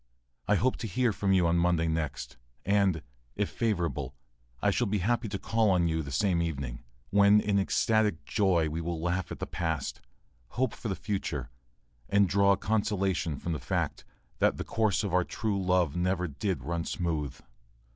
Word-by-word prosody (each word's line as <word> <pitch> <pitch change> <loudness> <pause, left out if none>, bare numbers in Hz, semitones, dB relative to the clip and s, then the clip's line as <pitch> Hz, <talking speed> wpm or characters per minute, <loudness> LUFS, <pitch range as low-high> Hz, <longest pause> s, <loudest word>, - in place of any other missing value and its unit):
I 105 - +4
hope 125 +5 +1
to 115 - -4
hear 120 +2 +1
from 100 0 0
you 95 -2 +4
on 85 +1 +3
Monday 85 -1 +2
next, 80 -5 -3 0.3
and, 95 -5 +2 0.3
if 105 -1 -1
favorable, 85 - -1 0.4
I 105 - +2
shall 120 +4 +1
be 105 +1 0
happy 115 +5 0
to 100 - -3
call 110 +2 +1
on 90 -3 +3
you 80 -1 0
the 70 -3 -7
same 85 +4 +1
evening, 70 -7 -4 0.3
when 100 +1 +6
in 105 -1 +1
ecstatic 105 -2 +1
joy 95 -6 +2
we 80 +2 -3
will 85 0 -3
laugh 90 +2 -1
at - - -5
the - - -4
past, 80 -4 -3 0.6
hope 130 -2 +1
for - - -6
the 95 - -1
future, 75 - -3 0.6
and 100 -1 +4
draw 100 +2 +4
consolation 100 -6 0
from 85 - -4
the 75 - -3
fact - - -2 0.4
that - - +3
"the - - -3
course 110 -3 +1
of 100 -4 -3
true 105 -4 -1
love 90 -4 +2
never 90 +1 0
did 80 - -3
run 85 +3 -2
smooth." 80 - -3
95 Hz, 175 wpm, -29 LUFS, 80-105 Hz, 0.6 s, when